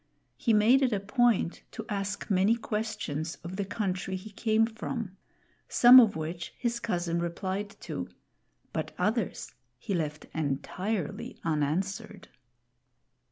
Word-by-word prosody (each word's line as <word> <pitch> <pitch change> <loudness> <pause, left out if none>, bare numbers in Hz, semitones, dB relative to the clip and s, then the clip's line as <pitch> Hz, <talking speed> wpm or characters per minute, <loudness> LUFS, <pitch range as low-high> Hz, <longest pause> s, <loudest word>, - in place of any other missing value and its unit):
He 235 - 0
made 225 +5 +5
it 260 -2 +3
a 205 - +1
point 220 -3 +2
to 220 - -6
ask 200 0 -3
many 195 +4 +4
questions 210 -9 -3
of 175 +2 -6
the 200 - -1
country 190 -2 -2
he 200 +3 -8
came 220 +1 +2
from; 220 -2 -5 0.5
some 250 +1 +9
of 225 -5 +5
which 165 +2 -5
his 235 -1 -1
cousin 175 -6 -1
replied 190 +4 -3
to, 90 0 -4 0.7
but - - -3
others - - -1 0.2
he 195 - -4
left 150 -4 -2
entirely 160 +5 -3
unanswered. 170 +8 -2
195 Hz, 125 wpm, -29 LUFS, 170-220 Hz, 0.7 s, some